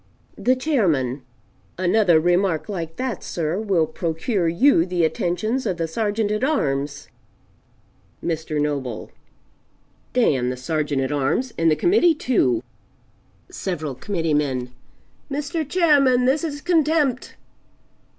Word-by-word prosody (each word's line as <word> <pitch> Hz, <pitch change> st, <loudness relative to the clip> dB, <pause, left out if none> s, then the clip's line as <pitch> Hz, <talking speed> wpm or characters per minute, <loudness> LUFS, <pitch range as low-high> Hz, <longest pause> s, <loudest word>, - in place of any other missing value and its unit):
The 255 Hz, +1 st, +3 dB
Chairman 170 Hz, -, 0 dB, 0.6 s
"Another 185 Hz, -2 st, +3 dB
remark 175 Hz, 0 st, +1 dB
like 170 Hz, -6 st, -5 dB
that, 255 Hz, -5 st, -3 dB
sir, 170 Hz, +2 st, -2 dB
will 195 Hz, -7 st, +1 dB
procure 165 Hz, +4 st, -2 dB
you 170 Hz, +4 st, +4 dB
the 175 Hz, -2 st, 0 dB
attentions 215 Hz, +10 st, -1 dB
of 180 Hz, -, -1 dB
the 165 Hz, -1 st, -1 dB
Sergeant 210 Hz, +4 st, -1 dB
at 215 Hz, +3 st, -1 dB
arms." 145 Hz, -, -1 dB, 1.2 s
Mr. 160 Hz, -2 st, -2 dB
Noble 140 Hz, -6 st, -3 dB, 1.0 s
"D 245 Hz, -, +3 dB
n 125 Hz, -1 st, -1 dB
the 125 Hz, -, -4 dB
Sergeant 145 Hz, 0 st, -1 dB
at 130 Hz, -, -2 dB
arms, 150 Hz, -, 0 dB
and 165 Hz, 0 st, +2 dB
the 155 Hz, -, +3 dB
Committee 350 Hz, -, +3 dB
too!" 135 Hz, -, +1 dB, 0.9 s
Several 155 Hz, -7 st, -4 dB
Committeemen 150 Hz, -6 st, -1 dB, 0.6 s
"Mr. 295 Hz, +2 st, -3 dB
Chairman, 285 Hz, -8 st, +4 dB
this 275 Hz, +6 st, +2 dB
is 290 Hz, -3 st, -4 dB
Contempt!" 310 Hz, -6 st, +1 dB
180 Hz, 120 wpm, -22 LUFS, 155-255 Hz, 1.2 s, you